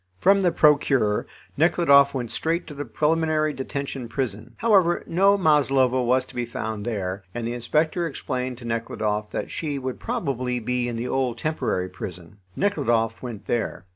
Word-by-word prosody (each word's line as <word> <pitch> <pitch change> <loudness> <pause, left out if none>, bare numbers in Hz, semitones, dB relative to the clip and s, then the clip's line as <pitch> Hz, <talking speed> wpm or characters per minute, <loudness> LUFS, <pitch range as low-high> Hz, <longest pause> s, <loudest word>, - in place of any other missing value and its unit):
From 195 - +4
the 180 -2 +3
Procureur 140 -9 +3 0.3
Nekhludoff 140 -4 +5
went 120 -4 -3
straight 165 +2 -1
to 150 - -9
the 145 0 -5
preliminary 155 +4 +1
detention 135 -2 -5
prison. 115 -5 -4
However, 195 -7 +3
no 195 +4 +4
Maslova 135 -6 +3
was 125 +1 +2
to - - -16
be 120 - -2
found 110 -3 -4
there, 100 -3 -3
and 120 -1 -3
the 120 - -2
inspector 155 +8 0
explained 130 -4 -4
to 120 - -11
Nekhludoff 105 -2 -2
that - - -4
she 150 -3 -3
would 130 -1 -4
probably 135 - -2
be 125 +1 -1
in 120 - -3
the 115 +2 -3
old 125 -2 -1
temporary 120 -10 -1
prison. 90 0 -9 0.2
Nekhludoff 115 - 0
went 120 -5 -7
there. 115 -5 -2
130 Hz, 165 wpm, -24 LUFS, 115-155 Hz, 0.3 s, Nekhludoff